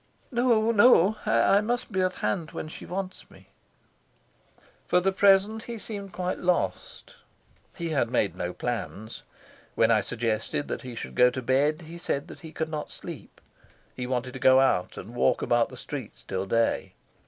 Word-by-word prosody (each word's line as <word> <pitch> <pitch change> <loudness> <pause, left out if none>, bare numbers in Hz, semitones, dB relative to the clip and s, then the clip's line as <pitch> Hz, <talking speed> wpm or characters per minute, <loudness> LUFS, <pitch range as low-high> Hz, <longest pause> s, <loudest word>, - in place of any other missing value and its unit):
"No, 235 -2 +3
no; 215 -2 +5
I 200 - +4
must 240 +2 -2
be 190 -2 0
at 185 0 0
hand 165 -4 -2
when - - -5
she - - -9
wants 185 +1 -5
me." - - -19 1.4
For 180 - +4
the 190 +2 +1
present 200 +3 +3
he 235 -1 -6
seemed 205 -3 -6
quite 180 0 -3
lost. 180 - -2 0.6
He 170 -2 -4
had 140 -7 +1
made 100 -4 0
no 90 0 -3
plans. 110 -1 -5 0.5
When 115 0 +4
I 110 -2 +4
suggested 115 +7 -2
that - - -3
he 125 -2 -8
should 65 - -6
go 125 - +5
to 130 0 -5
bed 145 +6 +2
he 165 +2 -10
said 140 -4 -3
he 160 -2 -9
could 160 0 -3
not 155 -1 -4
sleep; - - -9 0.6
he 125 - -4
wanted 125 0 -2
to 130 - -7
go 130 +1 +6
out 110 -9 +1
and 110 +6 -8
walk 120 - +2
about 120 -1 +2
the 130 - -11
streets 130 -4 -7
till 95 0 -3
day. 115 +3 0
155 Hz, 175 wpm, -27 LUFS, 120-195 Hz, 1.4 s, go